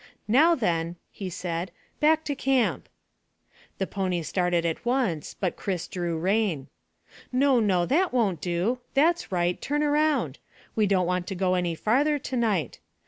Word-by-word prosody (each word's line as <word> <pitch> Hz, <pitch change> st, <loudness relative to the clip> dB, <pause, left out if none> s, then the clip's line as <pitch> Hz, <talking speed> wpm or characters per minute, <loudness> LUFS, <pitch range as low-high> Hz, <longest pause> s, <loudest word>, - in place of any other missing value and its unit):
"Now 305 Hz, +10 st, +5 dB
then," 170 Hz, -, -1 dB, 0.2 s
he 195 Hz, -2 st, -6 dB
said, 175 Hz, +1 st, -3 dB, 0.3 s
"back 315 Hz, +1 st, +3 dB
to 290 Hz, -, -2 dB
camp." 270 Hz, -3 st, 0 dB, 0.9 s
The 190 Hz, -, -1 dB
pony 185 Hz, -3 st, -2 dB
started 175 Hz, +1 st, 0 dB
at 165 Hz, -1 st, -2 dB
once, 240 Hz, -, -1 dB
but 185 Hz, -3 st, -1 dB
Chris 185 Hz, -4 st, -3 dB
drew 175 Hz, -2 st, -3 dB
rein. 185 Hz, -5 st, 0 dB, 0.6 s
"No, 265 Hz, 0 st, +3 dB
no; 190 Hz, -5 st, +2 dB
that 345 Hz, -, +2 dB
won't 215 Hz, -9 st, +1 dB
do. 180 Hz, +8 st, 0 dB, 0.2 s
That's 320 Hz, +1 st, +2 dB
right, 175 Hz, -1 st, 0 dB
turn 295 Hz, +1 st, 0 dB
round. 295 Hz, -, +1 dB, 0.4 s
We 215 Hz, -2 st, +3 dB
don't 190 Hz, -2 st, +2 dB
want 180 Hz, 0 st, -1 dB
to 195 Hz, -, -4 dB
go 185 Hz, 0 st, +1 dB
any 175 Hz, -2 st, 0 dB
farther 280 Hz, -, +2 dB
to 260 Hz, -2 st, -5 dB
night. 210 Hz, -, 0 dB
195 Hz, 155 wpm, -26 LUFS, 175-260 Hz, 0.9 s, Now